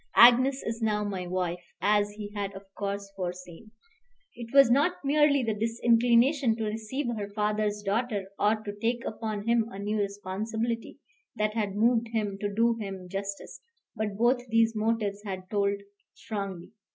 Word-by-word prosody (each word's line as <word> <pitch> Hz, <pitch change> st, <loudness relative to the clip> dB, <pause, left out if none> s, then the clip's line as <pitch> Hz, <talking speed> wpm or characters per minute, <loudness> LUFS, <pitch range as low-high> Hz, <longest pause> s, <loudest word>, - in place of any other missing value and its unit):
Agnes 255 Hz, +3 st, +7 dB
is 225 Hz, +1 st, -4 dB
now 210 Hz, -1 st, +1 dB
my 190 Hz, -3 st, -3 dB
wife, 180 Hz, -1 st, -2 dB, 0.2 s
as 205 Hz, 0 st, +3 dB
he 205 Hz, -1 st, -7 dB
had, 200 Hz, -1 st, -3 dB
of 195 Hz, 0 st, -9 dB
course, 200 Hz, -1 st, -4 dB
foreseen. 180 Hz, +2 st, -6 dB, 0.7 s
It 235 Hz, -1 st, -8 dB
was 275 Hz, -3 st, +7 dB
not 290 Hz, +8 st, +3 dB
merely 285 Hz, -1 st, +4 dB
the 225 Hz, -2 st, 0 dB
disinclination 235 Hz, +3 st, +3 dB
to 225 Hz, -, -3 dB
receive 220 Hz, +6 st, -3 dB
her 205 Hz, -2 st, -4 dB
father's 210 Hz, 0 st, -1 dB
daughter, 205 Hz, 0 st, -1 dB
or 210 Hz, +2 st, +4 dB
to 205 Hz, -, -5 dB
take 235 Hz, +1 st, 0 dB
upon 215 Hz, -1 st, -4 dB
him 230 Hz, -1 st, +3 dB
a 195 Hz, -, -9 dB
new 210 Hz, +2 st, -2 dB
responsibility, 215 Hz, +4 st, -3 dB, 0.4 s
that 215 Hz, -1 st, 0 dB
had 210 Hz, -3 st, -2 dB
moved 230 Hz, +2 st, +3 dB
him, 210 Hz, -3 st, -2 dB
to 205 Hz, 0 st, -2 dB
do 230 Hz, +3 st, +3 dB
him 195 Hz, -3 st, -6 dB
justice; 195 Hz, +1 st, -5 dB, 0.3 s
but 210 Hz, -2 st, -3 dB
both 245 Hz, +2 st, +3 dB
these 230 Hz, 0 st, +3 dB
motives 215 Hz, -2 st, 0 dB
had 185 Hz, -3 st, -6 dB
told 200 Hz, -1 st, +1 dB, 0.4 s
strongly. 195 Hz, -5 st, -5 dB
215 Hz, 160 wpm, -28 LUFS, 200-230 Hz, 0.7 s, Agnes